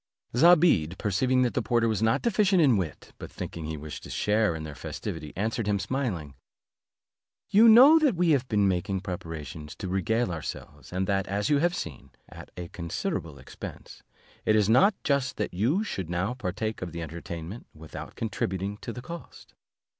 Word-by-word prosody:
Zobeide 150 - +5
perceiving 125 +6 +1
that 125 - 0
the - - 0
porter 115 -1 +1
was 110 -2 0
not 110 0 +2
deficient 205 -4 +3
in 140 -7 +5
wit, 90 -6 -4
but - - -8
thinking 80 -2 -6
he 80 0 -4
wished 75 +1 -7
to - - -11
share 105 -4 +1
in 80 - -5
their 75 -1 -7
festivity, 75 +1 -6
answered 110 +2 -2
him, 105 -1 +2
smiling, 100 - -3 1.2
"You 225 +3 +7
know 270 +8 +9
that 290 -9 +3
we 175 -1 +2
have 135 -3 +2
been 105 -3 +2
making 95 +1 -1
preparations 80 -5 -7
to 95 - -6
regale 95 +4 0
ourselves, 75 -2 -7
and 95 +1 -1
that, 95 0 0
as 100 +5 -1
you 145 - +4
have 175 +3 +1
seen, 75 -6 -6 0.2
at - - -12
a 90 -1 -6
considerable 85 -3 -4
expense; 65 - -10 0.4
it 110 - +3
is 105 -2 +3
not 130 - +5
just 140 -3 0
that 105 - -2
you 125 - +1
should 95 - -4
now 90 +6 -1
partake 110 -1 -4
of 90 -3 -5
the 85 0 -4
entertainment 85 +5 -7
without 80 0 -10
contributing 100 -2 -3
to 115 - -6
the 125 +2 -8
cost." 170 +6 -10
105 Hz, 180 wpm, -27 LUFS, 85-130 Hz, 1.2 s, know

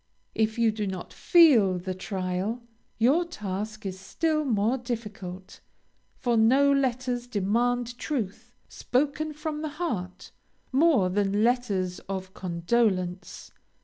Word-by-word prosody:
If 220 +1 0
you 230 -1 +3
do 210 -1 -3
not 190 -2 -6
feel 250 - +5
the 185 +1 -4
trial, 190 +4 -3 0.3
your 270 +10 +4
task 215 - -5
is 190 -1 -4
still 305 - 0
more 225 -1 +1
difficult, 210 -6 -6 0.6
for 240 -2 0
no 260 +6 +5
letters 255 -2 0
demand 240 +3 0
truth, 235 -4 -4 0.2
spoken 295 +4 -1
from 300 0 -4
the 310 - -3
heart, 185 - -4 0.4
more 265 - +4
than 205 +1 +1
letters 205 -7 0
of 190 -1 -5
condolence. 185 0 -1
225 Hz, 115 wpm, -27 LUFS, 190-255 Hz, 0.6 s, feel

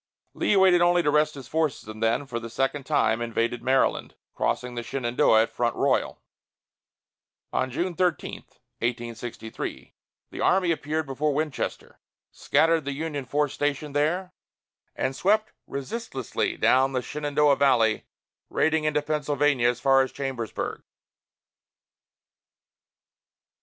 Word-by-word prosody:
Lee - - +1
waited 190 -2 +5
only 175 0 +4
to 150 - +2
rest 150 0 +2
his 135 -3 -9
forces 155 -8 -1
and 110 0 -8
then, 115 +5 +1
for 120 -3 -4
the 115 0 -7
second 135 +3 -2
time, 110 +1 +2
invaded 115 +1 -1
Maryland, 130 +2 +1 0.2
crossing 125 0 -1
the 120 - -3
Shenandoah 120 -2 +2
at - - -5
Front 120 -1 -1
Royal. - - 0 1.3
On 130 - 0
June 175 +8 -2
13, 175 -2 -1 0.4
1863, 120 -1 -5 0.4
the - - -6
army 185 -2 +3
appeared 155 0 -2
before 140 +2 -1
Winchester, 150 -2 -3 0.3
scattered 165 -1 +2
the 140 - -2
Union 145 -2 -4
force 145 +2 0
stationed 145 0 -2
there, 175 +6 0 0.6
and 130 0 -1
swept 215 +8 +1
resistlessly 140 - -3
down 135 +1 +3
the 130 -1 -1
Shenandoah 145 -1 +1
Valley, 115 -6 +3 0.4
raiding 160 0 +1
into 150 -1 +1
Pennsylvania 145 -4 +1
as 120 0 -2
far 135 +1 +4
as 130 - -1
Chambersburg. 130 -5 -4
140 Hz, 125 wpm, -26 LUFS, 125-155 Hz, 1.3 s, waited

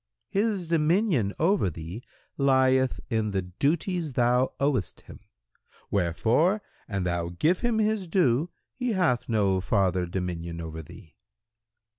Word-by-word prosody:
"—"His 200 -3 0
dominion 165 - +2
over 180 - +2
thee 85 +6 -7 0.3
lieth 130 -1 +3
in 110 -2 +1
the 95 -2 -1
duties 150 - -1
thou 125 +1 +2
owest 140 - -1
him; - - -13 0.7
wherefore, 115 - +2 0.2
an 100 -3 -2
thou 85 -1 -1
give 155 - +1
him 240 -2 0
his 215 -3 0
due, 160 -3 +2 0.2
he 250 -3 -2
hath 165 - +1
no 100 -4 +2
farther 95 -2 +1
dominion 85 -2 -4
over 80 -1 -6
thee." 80 +2 -15
125 Hz, 125 wpm, -27 LUFS, -, 0.7 s, lieth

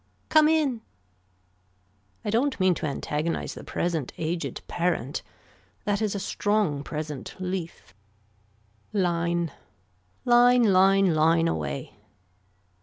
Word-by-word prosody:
Come 310 -1 +6
in. 290 -8 +1 1.4
I 210 - -1
don't 260 +4 +1
mean 185 -1 +4
to 165 - -3
antagonize 150 +3 -2
the - - -10
present 165 -6 -2
aged 165 +1 -3
parent. 170 -5 -1 0.6
That 205 0 0
is 210 -2 0
a - - -2
strong 200 -6 0
present 150 -2 -6
leaf. 180 - -5 1.0
Line. 170 -3 0 0.7
Line 245 0 +6
line 195 -2 +5
line 165 +2 +3
away. 70 - -3
175 Hz, 105 wpm, -26 LUFS, 160-210 Hz, 1.4 s, Come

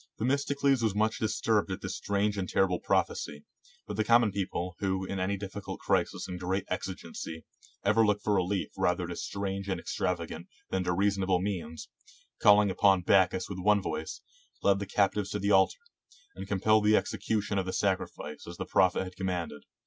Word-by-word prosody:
Themistocles 140 +2 +1
was 110 -3 +1
much 110 +1 +1
dis 110 -1 -1
turbed 110 -3 +2
at 95 +1 -4
this - - -4
strange 100 +1 0
and 95 -3 -3
terrible 90 -2 +2
prophecy, 75 0 -1 0.4
but 105 - -6
the 110 - +2
common 115 -1 +4
people, 90 -2 -3
who, 95 -1 -1
in 95 0 -4
any 95 +2 0
difificult 100 +1 -6
crisis - - 0
and 90 -1 -6
great 95 +2 -1
exigency, 90 -3 -5 0.4
ever 110 +3 +4
look 105 -1 +2
for 105 0 0
relief 95 0 0
rather 90 -1 +1
to 85 +1 -5
strange 100 +1 -4
and 95 -2 -1
ex - - -5
travagant 85 -1 -2 0.2
than 95 -1 0
to 90 - +1
reasonable 95 0 +1
means, 90 -5 -4 0.5
calling 105 -1 +6
upon 95 0 +4
Bac 95 0 +5
chus 95 - -4
with 95 -2 -6
one 105 +2 +4
voice, 80 -4 -4 0.4
led 100 -1 +4
the 100 - -4
captives 100 0 +1
to 105 - -2
the 100 0 0
altar, 95 -1 +4 0.6
and 95 0 -8
compelled 105 +2 +3
the 105 0 +6
execution 105 -1 -1
of 95 - -3
the - - -1
sacrifice 95 -6 -2
as - - -8
the - - -4
prophet 95 0 +3
had 90 -1 -9
commanded. 90 -6 -3
95 Hz, 185 wpm, -29 LUFS, 90-105 Hz, 0.6 s, calling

